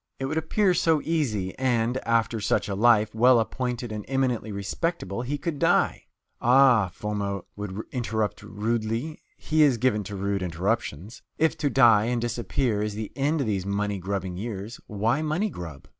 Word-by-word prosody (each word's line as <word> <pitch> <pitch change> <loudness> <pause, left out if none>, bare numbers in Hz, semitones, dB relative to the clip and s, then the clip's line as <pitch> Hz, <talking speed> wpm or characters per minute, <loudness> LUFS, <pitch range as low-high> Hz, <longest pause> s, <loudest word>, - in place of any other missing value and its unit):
It 135 - -3
would 155 +4 0
appear 185 +4 +2
so 165 -3 +3
easy, 115 - -1
and, 120 -1 +1
after 115 -1 +1
such 105 - +1
a 100 - -2
life, 110 0 +4
well 120 +2 +5
appointed 120 +1 -3
and 105 -1 -5
eminently 125 -5 0
respectable, 100 - -3
he 135 +4 -3
could 155 -1 -4
die. - - +2 0.4
"Ah," 125 -5 +5
Foma 100 -2 -3
will 105 0 -5
interrupt 110 -4 -2
rudely 115 +7 -3 0.2
he 155 0 +1
is 140 -5 +5
given 115 -3 +1
to 100 - -6
rude 100 0 -1
interruptions 90 - -3 0.2
"if 160 +1 +2
to 145 - +1
die 115 -6 +5
and 120 0 0
disappear 120 -1 -1
is 105 -1 -2
the 110 -1 -5
end 145 +2 +1
of - - 0
these 100 -4 -1
money 100 0 -1
grubbing 95 -1 -3
years, 105 +2 -6
why 110 +7 0
money 160 +7 -1
grub?" 80 -5 -9
115 Hz, 170 wpm, -26 LUFS, 105-135 Hz, 0.4 s, well